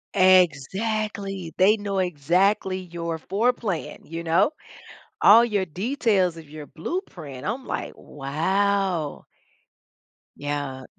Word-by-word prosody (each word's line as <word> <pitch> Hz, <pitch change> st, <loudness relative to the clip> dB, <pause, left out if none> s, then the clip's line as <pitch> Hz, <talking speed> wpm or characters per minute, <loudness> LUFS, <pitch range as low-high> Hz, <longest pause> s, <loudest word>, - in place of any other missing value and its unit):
Exactly, 190 Hz, +2 st, +2 dB
they 205 Hz, +4 st, +5 dB
know 200 Hz, -2 st, -2 dB
exactly 185 Hz, +4 st, +1 dB
your 170 Hz, -2 st, -5 dB
floor 220 Hz, +9 st, +1 dB
plan, 180 Hz, -11 st, -4 dB
you 165 Hz, +1 st, -6 dB
know? 165 Hz, -, +3 dB, 0.7 s
All 230 Hz, +3 st, +8 dB
your 205 Hz, -5 st, 0 dB
details 190 Hz, -, 0 dB
of 155 Hz, -3 st, -12 dB
your 150 Hz, 0 st, -9 dB
blueprint. 160 Hz, -, -6 dB
I'm 245 Hz, +6 st, -3 dB
like, -, -, -4 dB
"Wow." 175 Hz, +3 st, -1 dB, 1.1 s
Yeah. 145 Hz, -2 st, -4 dB
185 Hz, 105 wpm, -24 LUFS, 160-205 Hz, 1.1 s, All